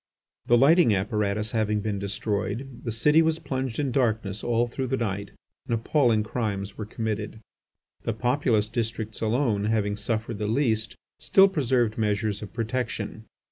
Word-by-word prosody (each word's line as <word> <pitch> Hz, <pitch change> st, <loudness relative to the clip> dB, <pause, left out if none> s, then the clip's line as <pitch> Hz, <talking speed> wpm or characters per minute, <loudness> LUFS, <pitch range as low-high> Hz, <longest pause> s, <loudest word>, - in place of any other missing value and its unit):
The 120 Hz, -, +5 dB
lighting 140 Hz, -, +5 dB
apparatus 105 Hz, +1 st, -1 dB
having 105 Hz, -2 st, +1 dB
been 105 Hz, -1 st, -2 dB
destroyed, 105 Hz, +5 st, -3 dB
the 115 Hz, -, -2 dB
city 150 Hz, +9 st, +4 dB
was 160 Hz, -1 st, +2 dB
plunged 130 Hz, -6 st, -3 dB
in 140 Hz, -3 st, 0 dB
darkness 110 Hz, -6 st, 0 dB
all 120 Hz, 0 st, +2 dB
through 130 Hz, +2 st, -3 dB
the 130 Hz, +1 st, 0 dB
night, 100 Hz, -3 st, -3 dB, 0.4 s
and 115 Hz, -, +1 dB
appalling 115 Hz, -2 st, +2 dB
crimes 100 Hz, -3 st, -3 dB
were 105 Hz, -, -6 dB
committed. 110 Hz, -1 st, -4 dB, 0.6 s
The 115 Hz, -, -2 dB
populous 120 Hz, -2 st, +1 dB
districts 110 Hz, -1 st, -3 dB
alone, 110 Hz, -2 st, +1 dB
having 105 Hz, -2 st, +1 dB
suffered 110 Hz, +1 st, -3 dB
the 105 Hz, -, -1 dB
least, 110 Hz, -2 st, 0 dB, 0.2 s
still 195 Hz, 0 st, +6 dB
preserved 125 Hz, -, +1 dB
measures 105 Hz, -1 st, 0 dB
of 105 Hz, -, -7 dB
protection. 115 Hz, -2 st, -3 dB
110 Hz, 150 wpm, -26 LUFS, 105-125 Hz, 0.6 s, still